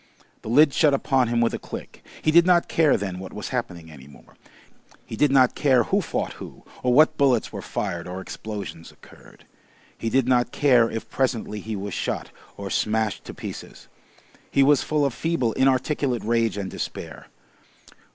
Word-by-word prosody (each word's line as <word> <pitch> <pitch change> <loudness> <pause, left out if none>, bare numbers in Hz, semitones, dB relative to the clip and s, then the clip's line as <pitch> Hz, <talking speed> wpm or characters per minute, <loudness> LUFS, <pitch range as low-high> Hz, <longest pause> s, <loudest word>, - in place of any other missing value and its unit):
The - - -8
lid 145 +4 +5
shut 145 -3 +4
upon 135 -2 +1
him 120 0 +1
with 115 - +1
a - - -3
click. - - -9 0.2
He 155 - +3
did 170 +2 +7
not 175 -1 +3
care 160 -3 +3
then 95 -2 -5
what 95 - -9
was 105 - -6
happening 90 -10 -5
any 70 -3 -13
more. 70 - -18 0.7
He - - -7
did 150 +6 +3
not 130 -2 +4
care 130 -5 +3
who - - +1
fought - - -3
who, - - -10 0.2
or 125 - +1
what 155 +5 +5
bullets 130 -5 +2
were - - -5
fired 85 -4 -4
or 90 +1 -6
explosions 100 -4 -7
occurred. - - -19 0.5
He 115 - -3
did 130 +1 +1
not 125 -1 +2
care 125 -5 +4
if 115 - -5
presently 120 -5 -2
he 110 +1 -5
was 100 -1 -5
shot - - -3 0.3
or 100 -1 -6
smashed 110 -3 -1
to - - -9
pieces. - - -9 0.6
He 140 - +3
was 145 0 +4
full 150 -2 0
of 140 - -1
feeble, 160 -9 -1
inarticulate 130 -1 +1
rage 115 -1 0
and 95 -2 -4
despair. - - -7
120 Hz, 180 wpm, -24 LUFS, 105-140 Hz, 0.7 s, did